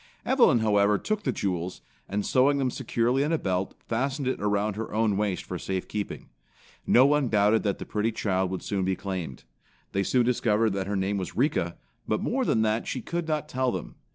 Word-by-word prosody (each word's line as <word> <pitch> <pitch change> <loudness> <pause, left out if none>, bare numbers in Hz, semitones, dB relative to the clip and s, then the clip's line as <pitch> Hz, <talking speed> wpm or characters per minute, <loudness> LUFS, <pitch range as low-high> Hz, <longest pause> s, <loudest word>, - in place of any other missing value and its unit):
Evelyn, 245 - +4
however, 105 -1 +3
took 215 - -2
the - - 0
jewels, 90 -2 -3 0.3
and 100 +1 -1
sewing 140 +2 +3
them 130 -2 0
securely 120 +1 0
in 150 +3 0
a 165 - +3
belt, 95 -5 -2
fastened 135 +4 -1
it 130 - -1
around 105 0 0
her 110 +1 -5
own 110 -1 +1
waist 100 -2 -1
for - - -5
safekeeping. 95 +2 -4 0.6
No 130 - +6
one 145 -2 +3
doubted 105 +1 +3
that 100 -2 -1
the - - -7
pretty 110 +2 -1
child 95 -4 0
would 95 0 -4
soon 100 -2 -1
be 95 0 +1
claimed. 90 -9 -5 0.5
They 100 - 0
soon 120 +5 +2
discovered 115 -3 +2
that 95 -1 -2
her 100 - -1
name 95 +1 0
was 90 -1 -5
Rika, 105 - 0 0.3
but 110 - +1
more 260 +1 0
than 110 - +2
that 110 +1 0
she 130 - -3
could 170 0 -3
not 155 -2 -1
tell 130 -1 0
them. - - -5
110 Hz, 205 wpm, -27 LUFS, 100-130 Hz, 0.6 s, No